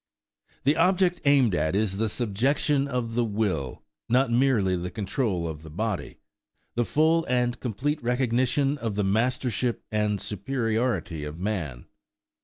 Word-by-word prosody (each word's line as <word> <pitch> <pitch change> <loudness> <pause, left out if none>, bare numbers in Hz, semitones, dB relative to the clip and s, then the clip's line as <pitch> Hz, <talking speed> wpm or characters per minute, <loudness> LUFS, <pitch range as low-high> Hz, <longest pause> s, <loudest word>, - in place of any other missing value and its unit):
The 145 +3 +3
object 180 +1 +3
aimed 135 -7 +4
at 80 +1 0
is 100 -2 0
the 110 +1 0
subjection 135 +6 +1
of 125 -4 -2
the 120 +1 +2
will, 100 - -2 0.3
not 125 +1 +3
merely 115 -7 +3
the 90 0 -3
control 95 -2 -1
of 80 -2 -6
the 80 - -11
body,–the 110 +4 -5
full 160 +4 +3
and 125 -1 0
complete 140 +6 -2
recognition 125 +3 +1
of 110 -3 -3
the 105 - +1
mastership 120 +3 0
and 105 -1 0
superiority 110 - -2
of 75 +1 -6
man. 85 - -3
115 Hz, 135 wpm, -26 LUFS, 100-130 Hz, 0.3 s, aimed